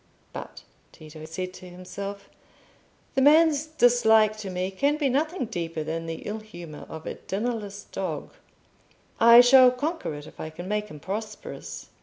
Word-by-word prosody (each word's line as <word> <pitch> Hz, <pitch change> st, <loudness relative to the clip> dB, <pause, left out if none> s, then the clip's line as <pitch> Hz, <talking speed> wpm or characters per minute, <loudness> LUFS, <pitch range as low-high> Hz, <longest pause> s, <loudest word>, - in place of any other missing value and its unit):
"But," -, -, -8 dB, 0.3 s
Tito 155 Hz, 0 st, -12 dB
said 185 Hz, +3 st, -5 dB
to 185 Hz, 0 st, -11 dB
himself, 195 Hz, +3 st, -7 dB, 0.9 s
"the 270 Hz, -, +1 dB
man's 305 Hz, +1 st, +5 dB
dislike 235 Hz, -7 st, +4 dB
to 210 Hz, -3 st, -6 dB
me 185 Hz, +1 st, -2 dB
can 285 Hz, +9 st, +1 dB
be 290 Hz, -3 st, +1 dB
nothing 310 Hz, +4 st, 0 dB
deeper 165 Hz, -7 st, -4 dB
than 165 Hz, +1 st, -4 dB
the 165 Hz, 0 st, -5 dB
ill 215 Hz, +1 st, -4 dB
humour 175 Hz, -8 st, -10 dB
of 160 Hz, 0 st, -8 dB
a -, -, -3 dB
dinnerless 205 Hz, -1 st, -4 dB
dog; -, -, -5 dB, 0.9 s
I 235 Hz, +1 st, +9 dB
shall 255 Hz, +1 st, +8 dB
conquer 285 Hz, -, -3 dB
it 145 Hz, 0 st, -9 dB
if -, -, -15 dB
I 155 Hz, -, -5 dB
can 175 Hz, +3 st, -9 dB
make 210 Hz, +1 st, -1 dB
him 150 Hz, -, -11 dB
prosperous." 210 Hz, +6 st, -7 dB
210 Hz, 160 wpm, -26 LUFS, 175-245 Hz, 0.9 s, I